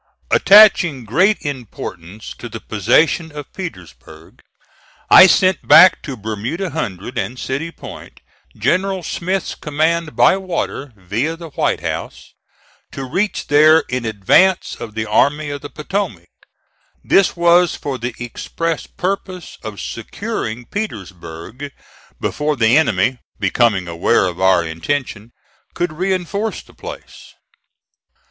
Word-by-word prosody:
Attaching 190 - +6
great 185 - +2
importance 110 - -7
to 120 - -7
the 115 - -7
possession 155 - +1
of 145 -1 -9
Petersburg, 80 - -10 0.7
I 185 - +10
sent 185 0 +2
back 185 +2 +8
to 135 -4 -7
Bermuda 110 - -4
Hundred 105 - -4
and 125 - -4
City 140 +6 -3
Point, - - -11 0.4
General 190 +1 0
Smith's 185 +3 -2
command 155 0 -1
by 125 +10 +4
water, 170 -7 -4
via 110 - -3
the 165 -2 -10
White - - -1
House, - - -6 0.6
to 135 - -5
reach 190 +11 -2
there 155 +2 +5
in 125 -1 -2
advance 115 - +2
of 115 -3 -8
the 110 0 -2
Army 145 +7 +1
of 145 -1 -6
the 145 - -8
Potomac. 140 - -4 0.7
This 195 - +3
was 170 0 +4
for 135 -3 -5
the 120 0 -4
express 160 +7 -4
purpose 185 -1 -5
of 110 -3 -7
securing 115 +2 -5
Petersburg 105 - -7 0.5
before 150 0 -1
the 115 -1 +3
enemy, 125 -4 +2 0.2
becoming 105 -7 +1
aware 85 +2 +1
of 90 0 -4
our 95 -2 +4
intention, 110 - -4 0.4
could 175 -2 -2
reinforce 190 +4 -2
the - - -20
place. - - -11
145 Hz, 125 wpm, -18 LUFS, 110-170 Hz, 0.7 s, I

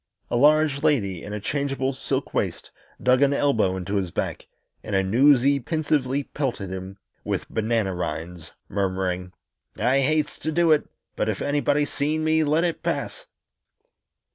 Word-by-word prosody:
A - - +1
large 150 +2 +4
lady 105 - +1
in 105 - -7
a 105 - -3
changeable 135 +3 -1
silk 130 - -3
waist - - -2 0.3
dug 130 +1 +4
an 140 0 +4
elbow 110 -11 +2
into 95 +3 -2
his 95 -3 -1
back, - - -4 0.4
and 100 - -3
a 95 - +3
newsy 135 +6 +4
pensively 145 -2 0
pelted 125 -10 -3
him 95 +1 -6 0.3
with - - -3
banana 110 -3 0
rinds, 90 -1 -5 0.2
murmuring, 95 -2 -2 0.5
"I 125 +5 +2
hates 150 +1 0
to 160 - -2
do 165 +1 +3
it 150 - +3 0.3
but - - 0
if - - -2
anybody 145 0 +1
seen 150 +3 -1
me 160 0 +3
let 155 +3 +2
it 170 -2 -1
pass!" - - -3
135 Hz, 155 wpm, -24 LUFS, 100-150 Hz, 0.5 s, large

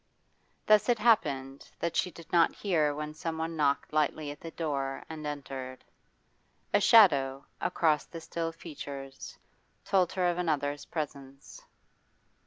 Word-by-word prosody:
Thus 215 +2 +5
it 240 - +4
happened 140 - +1
that 170 - -2
she 180 - +1
did 165 -1 -14
not 170 -1 +4
hear 155 -7 +1
when 150 0 -5
someone 160 +1 -4
knocked 145 -1 0
lightly 150 -1 0
at 145 - -10
the 165 - -7
door 140 -5 -3
and 155 -1 -6
entered. 135 -3 -6 0.9
A - - +4
shadow 140 - +5 0.2
across 160 -4 +1
the 165 - -9
still 165 0 -3
features 140 -4 -8 0.5
told 185 -3 +2
her 185 -1 0
of 175 0 0
another's 145 -4 -1
presence. 140 -3 -7
155 Hz, 135 wpm, -30 LUFS, 140-170 Hz, 0.9 s, Thus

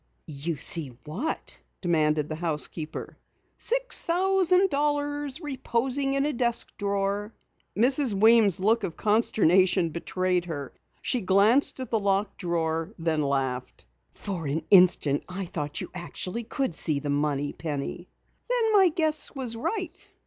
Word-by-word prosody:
"You 155 +3 -4
see 140 -3 +2
what?" 200 - -4 0.2
demanded 155 -4 +1
the 155 - -5
housekeeper. 155 -1 -5 0.4
"Six - - +1
thousand 370 +1 +2
dollars 290 0 -1
reposing 270 -2 -1
in 275 +1 +1
a 300 - -1
desk 235 -1 -1
drawer!" 200 +1 -2 0.4
Mrs. 260 +3 +4
Weems' 210 -2 +5
look 220 +4 +2
of 170 -4 -4
consternation 190 -5 +3
betrayed 180 +2 -1
her. 145 -6 -6 0.3
She 250 - 0
glanced 205 +9 +3
at 260 - -6
the 225 - +2
locked 200 0 -1
drawer, 165 -2 -2
and 165 - -10
then 160 -2 +1
laughed. 135 - -3 0.3
"For 180 -6 -5
an 155 +3 -2
instant 180 -7 +5
I 190 +1 -5
thought 150 -4 -4
you - - -7
actually 185 +5 -5
could 265 - -2
see 155 -3 +1
the 145 0 -3
money, 145 0 -1
Penny." 155 +3 -5 0.4
"Then 465 -3 +1
my 385 -3 +6
guess 310 -2 0
was 250 -4 -4
right?" 365 - -4
195 Hz, 140 wpm, -26 LUFS, 160-270 Hz, 0.4 s, my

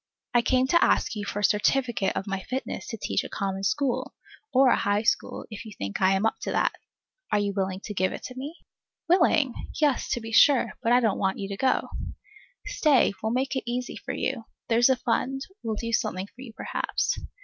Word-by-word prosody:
I 240 - +5
came 255 +1 +2
to 340 - +5
ask - - +2
you 205 -1 -4
for 205 - -3
a - - -4
certificate 215 0 +2
of 195 - -2
my 195 -1 -3
fitness 255 +7 -4
to 225 - -5
teach - - -1
a - - -7
common 195 -1 -3
school, 270 +4 0 0.4
or 265 0 +5
a - - +5
high 205 +1 +1
school, - - 0
if 215 - -7
you 220 -2 -10
think 100 0 -4
I 190 0 +5
am 195 +3 +1
up 225 - 0
to - - -3
that. - - +2 0.6
Are - - +3
you 205 -1 0
willing 190 -1 -2
to 210 - -6
give 185 -1 +1
it - - -7
to 255 - -7
me? 280 +5 -6 0.5
Willing? 330 -7 +4 0.3
Yes, 295 -4 +2
to - - -1
be 225 -1 -7
sure, 265 +3 +5
but 230 - +1
I 245 +1 +6
don't 220 -4 +1
want 190 -1 0
you 195 - -4
to 200 - -3
go. 260 +5 +1 0.8
Stay; 285 -9 +3
we'll 220 - -1
make 260 +3 0
it 260 -2 -3
easy 250 +1 -3
for - - -5
you. 225 - -2 0.2
There's 235 +2 +5
a 260 - +5
fund 255 +2 -1 0.2
will 220 -1 -2
do 230 +2 -4
something 185 -3 0
for 245 +5 -16
you, 245 -4 -9
perhaps. - - -2
230 Hz, 220 wpm, -26 LUFS, 200-260 Hz, 0.8 s, I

